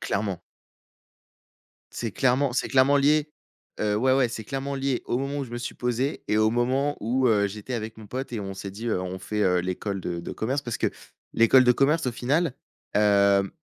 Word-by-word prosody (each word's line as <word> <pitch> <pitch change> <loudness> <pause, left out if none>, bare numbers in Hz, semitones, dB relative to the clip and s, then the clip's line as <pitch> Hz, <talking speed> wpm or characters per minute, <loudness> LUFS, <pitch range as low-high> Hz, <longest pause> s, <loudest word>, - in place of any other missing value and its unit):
Clairement. 100 -3 -2 1.5
C'est 115 -2 -3
clairement 130 +3 +1
c'est 125 - -1
clairement 135 +2 +4
lié. 150 +2 +3 0.5
Heu, 105 -1 +1
ouais, 130 +4 +3
ouais, 130 -3 +3
c'est 115 -1 -6
clairement 135 +3 -4
lié 135 -1 -1
au 120 - 0
moment 140 +1 -3
où 140 - -2
je 125 - -12
me 120 - -4
suis 120 - -5
posé 125 +4 -2
et 105 - +2
au 110 0 +4
moment 130 +5 0
où, 125 +4 +1
heu, 105 -3 +3
j'étais 105 +5 -6
avec 110 -1 -5
mon 110 -1 -11
pote 130 +3 -5
et 115 - -2
on 95 -1 -5
s'est 95 0 -6
dit, 110 +5 -7
heu: 110 -5 0
«On 95 0 -5
fait 105 +3 -4
heu, 90 -2 +3
l'école 95 +2 -3
de 85 -1 -4
de - - -6
commerce». 135 +6 -2
Parce 120 -2 -4
que - - +1 0.5
l'école 120 +3 +6
de 125 - +6
commerce, 140 +3 +2
au 125 - 0
final, 140 +5 0 0.4
hem, 100 -1 +4
120 Hz, 210 wpm, -25 LUFS, 105-135 Hz, 1.5 s, l'école